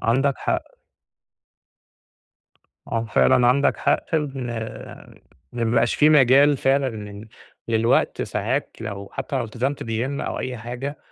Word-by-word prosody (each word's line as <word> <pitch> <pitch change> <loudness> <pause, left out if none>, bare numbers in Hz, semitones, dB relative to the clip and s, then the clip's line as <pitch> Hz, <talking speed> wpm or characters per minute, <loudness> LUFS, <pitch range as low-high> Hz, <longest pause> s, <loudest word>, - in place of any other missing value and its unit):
عندك 135 +4 +2
حق. - - -3 2.1
آه 115 -1 -2
فعلًا 120 - +4
عندك 140 +3 +3
حق - - 0
إن 140 -5 -2 1.1
ما 120 - -2
بقاش 115 +1 +2
في 150 - +4
مجال 140 0 +5
فعلًا 135 +1 +2
لل 105 +1 -9 0.4
للوقت، 115 +1 +2
ساعات - - -2
لو 100 -3 -6
حتى 140 - -4
لو 125 - -1
التزمت 125 +5 -3
بgym 120 +5 -3
أو - - -3
أي 125 -1 -4
حاجة 125 +5 -6
125 Hz, 125 wpm, -23 LUFS, 115-140 Hz, 2.1 s, مجال